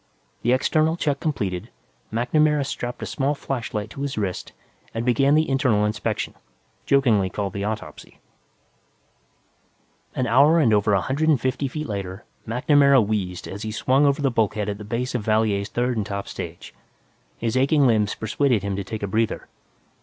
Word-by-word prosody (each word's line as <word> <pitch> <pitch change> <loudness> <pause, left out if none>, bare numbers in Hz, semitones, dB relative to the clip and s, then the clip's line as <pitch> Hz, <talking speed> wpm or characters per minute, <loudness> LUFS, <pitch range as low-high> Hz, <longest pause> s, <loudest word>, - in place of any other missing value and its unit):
The 120 - +1
external 155 +5 +2
check 145 -4 0
completed, 100 - -2 0.4
MacNamara 150 +5 +2
strapped 125 -3 -5
a - - -2
small 140 +2 -1
flashlight 115 -7 -4
to 140 - -8
his 140 -3 -3
wrist 95 -4 -3 0.4
and 115 +1 -2
began 135 +4 +3
the 155 +1 +3
internal 130 -6 +2
inspection, 105 0 -2 0.5
jokingly 115 -9 +3
called 100 0 -3
the 100 - -3
autopsy. 105 -8 -6 2.0
An 130 - 0
hour 140 +7 +5
and 130 -9 +4
over 105 0 +3
a 95 - +3
hundred 150 - 0
and 150 -5 +4
fifty 130 +3 -1
feet 150 +3 -5
later, 95 -3 -5 0.2
MacNamara 140 +4 +4
wheezed 95 -4 -3
as 100 - -7
he 110 - -4
swung 130 +6 +2
over 140 +1 +1
the 135 - +2
bulkhead 110 -2 0
at 100 0 -4
the - - -7
base 115 +4 -3
of 125 - -1
Valier's 110 -1 +1
third 120 0 -1
and 105 - -1
top 100 -1 -4
stage. 85 0 -7 0.6
His 115 0 -2
aching 140 +2 +3
limbs 110 -4 +2
persuaded 110 0 0
him 100 -1 -2
to 100 - -2
take 110 +1 -6
a - - 0
breather. 110 +3 -1
115 Hz, 170 wpm, -23 LUFS, 105-140 Hz, 2.0 s, hour